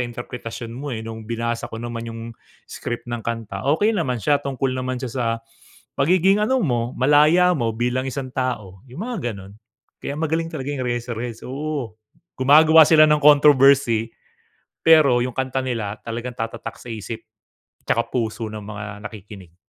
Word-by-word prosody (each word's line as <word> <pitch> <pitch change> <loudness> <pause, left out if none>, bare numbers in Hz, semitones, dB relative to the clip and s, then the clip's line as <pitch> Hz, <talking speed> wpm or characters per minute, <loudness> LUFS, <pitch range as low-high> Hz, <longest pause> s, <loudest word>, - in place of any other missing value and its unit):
interpretasyon 120 -1 -7
mo, 140 +4 -6
eh, 110 -3 -5
nung 110 0 -7
binasa 115 0 -2
ko - - -7
naman 115 0 -5
yung 115 0 -7 0.4
script 120 - -6
ng 120 -1 -4
kanta, 115 -4 -4
okey 210 +6 +2
naman 135 -10 -1
siya, 145 +5 +2
tungkol 135 -1 -2
naman 130 0 -3
siya 130 -2 -5
sa 125 -3 -2 0.7
pagiging 185 +7 +3
ano 260 +5 +2
mo, 120 -5 0
malaya 150 +7 +5
mo 120 -7 0
bilang 125 +3 -1
isang 130 -1 -5
tao, 110 -8 -3
yung 165 - -6
mga 190 - -3
ganun. 95 0 -11 0.5
Kaya 140 - -4
magaling 165 +1 -1
talaga 145 -3 -4
yung 130 -2 -3
Eraserheads 120 -1 -4
oo 135 -4 -4 0.4
gumagawa 155 +4 +7
sila 155 -1 +7
ng 150 -1 +3
controversy 140 -5 +5 0.7
pero 155 -6 +6
yung 125 0 -2
kanta 130 0 -1
nila 110 -4 -3
talagang 120 +1 -5
tatatak 115 0 -5
sa - - -15
isip, 110 0 -6 0.6
'tsaka - - +2
puso 115 -2 -2
ng 105 - -6
mga 105 0 -7 0.2
nakikinig. 95 -5 -13
125 Hz, 160 wpm, -22 LUFS, 115-145 Hz, 0.7 s, gumagawa